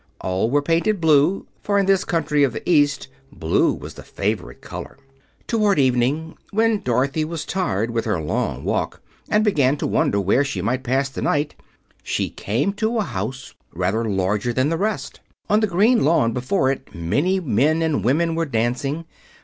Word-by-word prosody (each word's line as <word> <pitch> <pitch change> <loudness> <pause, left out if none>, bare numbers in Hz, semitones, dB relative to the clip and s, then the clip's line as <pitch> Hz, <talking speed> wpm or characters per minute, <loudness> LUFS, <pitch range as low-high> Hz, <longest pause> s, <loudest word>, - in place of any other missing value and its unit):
All 95 +4 -1
were 145 +2 +2
painted 170 +7 +1
blue, 160 +3 +3 0.2
for 205 -1 0
in 200 - +3
this 195 -1 +3
country 150 -3 +1
of 130 -4 +2
the - - -7
East 145 - +3 0.2
blue - - +1
was - - -7
the - - -11
favorite - - -3
color. - - -8 0.5
Toward 210 -5 +2
evening, 135 +4 +1
when 220 0 +1
Dorothy 140 -3 0
was 160 0 -4
tired 115 - -1
with 115 -1 -1
her 105 -6 0
long 75 - -2
walk - - -2 0.3
and 210 +1 +3
began 145 -9 +2
to - - -3
wonder 100 - +1
where 100 +8 +2
she 135 - -3
should 125 +4 -1
pass 135 +2 0
the 135 - -6
night, 145 +1 0 0.5
she - - -2
came 120 - -1
to 220 +3 -1
a 220 - +2
house 125 - -5 0.2
rather 95 +6 0
larger 100 +2 0
than 130 +4 +1
the 165 - 0
rest. 210 +3 -3 0.3
On 210 - +5
the 215 - +2
green 215 +6 +3
lawn 140 -7 +3
before 130 - +1
it 135 - -7
many 145 - 0
men 155 - +1
and 155 - 0
women 160 +8 +2
were 165 0 -1
dancing. 130 +6 -1
145 Hz, 180 wpm, -22 LUFS, 120-180 Hz, 0.5 s, On